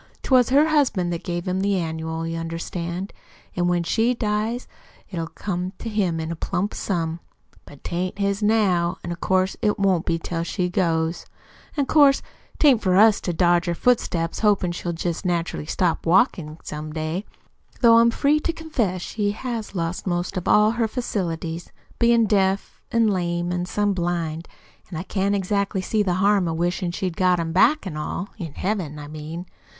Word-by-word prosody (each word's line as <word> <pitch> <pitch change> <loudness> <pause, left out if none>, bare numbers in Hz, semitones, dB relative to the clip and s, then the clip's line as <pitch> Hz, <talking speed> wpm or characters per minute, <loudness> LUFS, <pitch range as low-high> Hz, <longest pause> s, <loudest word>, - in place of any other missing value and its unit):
'Twas 255 -3 +4
her 290 +4 +4
husband 230 - +2
that 170 +1 -5
gave 175 +1 -3
him 185 +1 0
the 200 0 +1
annual, 160 -1 -3
you 165 0 -3
understand, 170 +3 -4 0.4
an' 175 -1 +1
when 175 -1 +1
she 230 +7 +1
dies 220 +2 -1 0.4
it'll 165 -3 -3
come 180 +1 -4
to - - -7
him 190 -6 0
in 160 +1 -3
a - - -3
plump 185 +5 -2
sum. 165 -3 -2 0.5
But 145 - -14
'tain't 180 +2 -3
his 200 +1 0
now, 195 -5 +2
an' 175 0 -3
'course 185 +1 +1
it 210 -1 +1
won't 190 -4 +1
be 165 - +2
till 165 0 -3
she 180 +1 -1
goes; 165 -3 0 0.5
an' 285 - +2
'course 280 -1 +5 0.3
'tain't 270 -7 +5
for 185 -2 +2
us 215 +1 +6
to 180 - -2
dodge 175 0 +2
her 170 - 0
footsteps 170 -8 +1
hopin' 205 -4 +2
she'll 175 0 -3
jest 170 +1 -3
naturally 170 -4 -2
stop 170 0 0
walkin' 170 - +2
some 150 0 -6
day 160 +4 -3 0.6
though 230 -2 +7
I'm 235 0 +5
free 285 +5 +2
to 335 - -1
confess 240 - -2
she 205 -2 -1
has 230 -3 -5
lost 170 +2 -3
most 175 +2 -1
all 210 +1 +5
her 230 -1 0
facilities, 170 -8 -3 0.3
bein' 235 -1 +4
deaf 195 -2 0
an' 230 -1 +3
lame 175 -3 0
an' 180 0 -2
some 205 +2 +1
blind; 170 -2 -2 0.4
an' 165 - -6
I 170 - -3
can't 200 +1 0
exactly 200 0 0
see 215 +3 +1
the 185 -4 +1
harm 195 -1 +3
in 165 -1 -2
wishin' 175 +1 -1
she 180 - -3
had 180 -3 -2
got 180 -1 +3
'em 165 -1 -2
all - - -5
back 250 - +4
in 185 - -4 0.6
Heaven, 185 -7 -2
I 145 -1 -8
mean. 155 +3 -7
185 Hz, 180 wpm, -23 LUFS, 170-210 Hz, 0.6 s, though